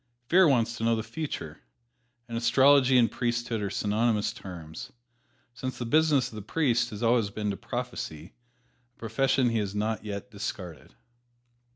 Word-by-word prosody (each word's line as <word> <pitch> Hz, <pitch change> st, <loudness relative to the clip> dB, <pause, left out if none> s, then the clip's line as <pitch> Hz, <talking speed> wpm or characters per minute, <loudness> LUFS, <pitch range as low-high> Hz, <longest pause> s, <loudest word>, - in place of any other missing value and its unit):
Fear 185 Hz, 0 st, +6 dB
wants 120 Hz, -4 st, +2 dB
to -, -, -5 dB
know 115 Hz, 0 st, +3 dB
the 110 Hz, -, -3 dB
future, 155 Hz, +4 st, -6 dB, 0.7 s
and 115 Hz, -, -6 dB
astrology 130 Hz, +3 st, +5 dB
and 120 Hz, -2 st, +4 dB
priesthood 120 Hz, -2 st, -2 dB
are 100 Hz, -, -2 dB
synonymous 105 Hz, +2 st, 0 dB
terms, 90 Hz, +6 st, -9 dB, 0.6 s
since 130 Hz, +1 st, -5 dB
the 120 Hz, -, -4 dB
business 150 Hz, +1 st, +3 dB
of -, -, -16 dB
the 105 Hz, -, -6 dB
priest 120 Hz, 0 st, +1 dB
has 105 Hz, +2 st, -6 dB
always 115 Hz, -3 st, +3 dB
been 105 Hz, 0 st, -3 dB
to -, -, -3 dB
prophesy, 80 Hz, +2 st, -6 dB, 0.6 s
a -, -, -38 dB
profession 125 Hz, +3 st, +1 dB
he 115 Hz, -, +1 dB
has 100 Hz, -1 st, -3 dB
not 110 Hz, +1 st, -1 dB
yet 100 Hz, -2 st, -6 dB
discarded. 90 Hz, -7 st, -7 dB
115 Hz, 160 wpm, -28 LUFS, 105-125 Hz, 0.7 s, Fear